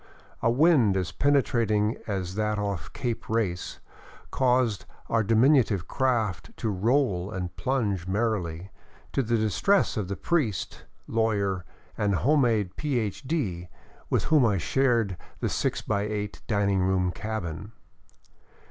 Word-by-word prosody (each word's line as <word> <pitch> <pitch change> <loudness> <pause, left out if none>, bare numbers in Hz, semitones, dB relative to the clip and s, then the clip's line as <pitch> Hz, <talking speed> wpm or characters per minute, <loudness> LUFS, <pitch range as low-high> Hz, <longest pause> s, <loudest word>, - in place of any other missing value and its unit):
A 115 - +3
wind 125 - +4
as 95 -1 -2
penetrating 115 -7 +2
as 95 -4 -3
that 105 +1 -1
off 100 -4 -3
Cape 120 -3 -4
Race 105 -6 -1 0.5
caused 125 -5 +1 0.2
our 115 -1 +2
diminutive 115 - +3
craft 120 -7 0
to 115 - -2
roll 100 -2 +1
and 90 -4 -5
plunge 105 -9 -1
merrily, 95 -4 -1 0.4
to - - +2
the 115 -1 +1
distress 110 - +2
of 105 -4 -1
the 100 - -3
priest, 130 - -1 0.2
lawyer, 100 -5 0 0.3
and 100 -2 +2
home 145 - +3
made 110 -7 +1
Ph.D., 120 - -2 0.4
with - - +1
whom 155 -4 +4
I 105 -4 +3
shared 115 -2 +1 0.2
the - - -1
six - - -1
by 105 -2 0
eight 105 -1 -4
dining 100 -2 +1
room 90 -1 +1
cabin. 100 -2 -5
105 Hz, 130 wpm, -27 LUFS, 95-120 Hz, 0.5 s, wind